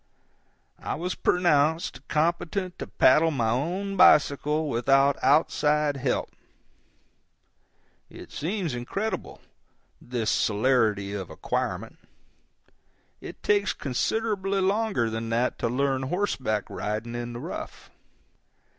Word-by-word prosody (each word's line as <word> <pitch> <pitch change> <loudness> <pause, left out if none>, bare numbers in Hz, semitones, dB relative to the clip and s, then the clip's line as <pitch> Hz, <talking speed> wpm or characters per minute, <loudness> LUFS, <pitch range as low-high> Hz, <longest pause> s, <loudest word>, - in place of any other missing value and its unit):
I - - -3
was 175 +4 -3
pronounced 160 -5 +1
competent 175 +4 -1
to - - -5
paddle 155 +5 +4
my 120 -7 0
own 180 - -2
bicycle 150 -1 +4
without 135 +2 +3
outside 150 +1 +2
help. 130 -1 -1 1.8
It - - -12
seems 175 -2 -3
incredible, 195 - -4 0.6
this 120 -3 -2
celerity 105 -3 +1
of 95 -3 -5
acquirement. - - -3 1.2
It - - -10
takes 205 -1 +2
considerably 195 - -1
longer 195 - +1
than 115 +1 -4
that 120 +2 0
to - - 0
learn 135 +1 0
horseback 130 - -1
riding 110 +3 -4
in 120 0 -5
the 120 - -6
rough. - - -8
140 Hz, 100 wpm, -26 LUFS, 120-180 Hz, 1.8 s, paddle